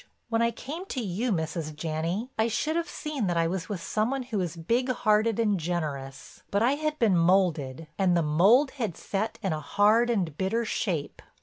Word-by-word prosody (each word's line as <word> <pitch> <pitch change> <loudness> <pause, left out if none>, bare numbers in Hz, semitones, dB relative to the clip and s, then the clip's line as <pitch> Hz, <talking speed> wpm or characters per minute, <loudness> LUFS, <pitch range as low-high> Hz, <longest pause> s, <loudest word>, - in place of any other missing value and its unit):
When 230 0 +1
I 235 - +3
came 300 +10 -7
to 265 - -3
you, 220 +3 -1
Mrs. 160 -3 -2
Janney, 165 - -3
I 220 +1 +2
should 300 +8 -1
have 340 0 -1
seen 295 -9 -3
that 175 -1 0
I 165 - +3
was 180 +2 -3
with 190 -5 -4
some 215 +2 0
one 270 -1 -2
who 235 -5 -3
was 175 -3 -2
big 230 +10 0
hearted 220 -2 +2
and 210 -4 +2
generous, 150 -5 -4
but 200 +2 +1
I 245 - +4
had 305 +1 -1
been 220 -8 +3
molded 165 -5 +2
and 180 -2 +3
the 170 - +2
mold 200 - +4
had 205 -8 -2
set 215 +3 -3
in 190 -5 0
a 155 - -2
hard 210 +9 +3
and 185 -10 0
bitter 225 +5 0
shape. 175 -9 -2
200 Hz, 205 wpm, -27 LUFS, 165-235 Hz, -, I